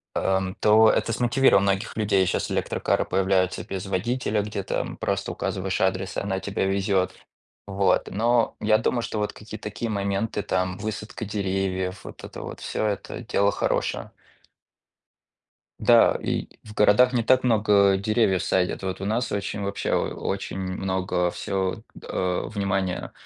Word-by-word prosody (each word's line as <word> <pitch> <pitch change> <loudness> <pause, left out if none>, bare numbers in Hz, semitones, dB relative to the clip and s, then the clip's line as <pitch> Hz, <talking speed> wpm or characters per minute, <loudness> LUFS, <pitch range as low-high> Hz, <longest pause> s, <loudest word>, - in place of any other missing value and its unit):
ам, 95 -1 0
то 110 +1 +6
это 115 - +1
смотивировало 120 -2 +4
многих 100 0 0
людей. 100 -3 +2
Щас - - -1
электрокары - - 0
появляются 95 -1 +1
без 95 -1 -5
водителя, 105 +3 -1
где 105 -1 -4
там - - -3
просто - - -2
указываешь 95 0 -2
адрес, 95 0 0
и - - +2
она 95 -1 -2
тебе 100 0 -2
везет, 95 -1 +1 0.5
вот. 95 -1 +1
Но 115 +3 +2
я 110 0 +3
думаю, 120 -2 0
что 115 -2 -3
вот 105 - -1
какие-то 110 0 -10
такие 110 +2 -4
моменты, 100 +1 -1
там 90 -1 -1
высадка 110 +2 -5
деревьев, 95 -2 -2
вот - - -11
это - - -8
вот - - -7
всё, - - -2
это 100 -2 -4
дело 100 0 +1
хорошее. - - -1 1.7
Да, - - +5
и - - -2 0.2
в 110 - -11
городах 110 +5 +5
не 120 - +1
так 130 +2 +3
много 100 -4 +4
деревьев 100 -2 +2
садят. 90 0 0
Вот 95 -1 -4
у - - -2
нас 115 +4 -1
очень, 100 0 -3
вообще, 100 0 -3
о - - +4 0.3
очень 95 0 -3
много 95 -1 -1
всё, 95 +1 -2 0.2
а, 90 -1 -2
внимания, 95 -3 -2
100 Hz, 150 wpm, -25 LUFS, 95-110 Hz, 1.7 s, то